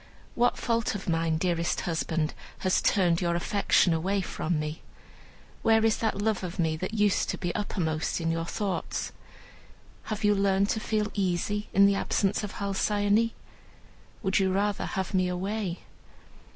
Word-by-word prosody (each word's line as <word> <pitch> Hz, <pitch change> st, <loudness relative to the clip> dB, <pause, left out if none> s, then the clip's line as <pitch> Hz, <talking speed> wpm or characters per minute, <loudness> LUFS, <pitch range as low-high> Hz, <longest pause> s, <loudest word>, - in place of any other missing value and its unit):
"What 245 Hz, +1 st, +2 dB
fault 230 Hz, -2 st, 0 dB
of 200 Hz, -, -6 dB
mine, 165 Hz, -1 st, +1 dB
dearest 170 Hz, 0 st, 0 dB
husband, 165 Hz, -2 st, -1 dB, 0.3 s
has 185 Hz, -, +3 dB
turned 175 Hz, -4 st, +2 dB
your 170 Hz, -1 st, +1 dB
affection 180 Hz, -1 st, +3 dB, 0.3 s
from 165 Hz, -1 st, -2 dB
me? 150 Hz, +1 st, -4 dB, 0.8 s
Where 225 Hz, 0 st, +4 dB
is 225 Hz, -, +3 dB
that 220 Hz, -3 st, -1 dB
love 210 Hz, -2 st, 0 dB
of 180 Hz, +1 st, -5 dB
me 160 Hz, -3 st, +1 dB
that 185 Hz, +6 st, -4 dB
used 205 Hz, -2 st, +2 dB
to -, -, -2 dB
be 175 Hz, -2 st, -2 dB
uppermost 160 Hz, -7 st, -1 dB
in 165 Hz, -1 st, 0 dB
your 165 Hz, 0 st, -2 dB
thoughts? 195 Hz, -3 st, -3 dB, 0.9 s
Have 215 Hz, 0 st, -4 dB
you 210 Hz, 0 st, +5 dB
learned 195 Hz, 0 st, +2 dB
to 220 Hz, -, 0 dB
feel 215 Hz, -1 st, -1 dB
easy 200 Hz, +2 st, -1 dB
in 200 Hz, +1 st, +6 dB
the 200 Hz, -, +5 dB
absence 195 Hz, +1 st, 0 dB
of 205 Hz, -, -5 dB
Halcyone? 205 Hz, +2 st, +1 dB, 0.9 s
Would 190 Hz, +1 st, +2 dB
you 190 Hz, -1 st, +2 dB
rather 200 Hz, +1 st, 0 dB
have 190 Hz, 0 st, -3 dB
me 185 Hz, -1 st, +2 dB
away?" 185 Hz, 0 st, -3 dB
195 Hz, 155 wpm, -28 LUFS, 175-210 Hz, 0.9 s, in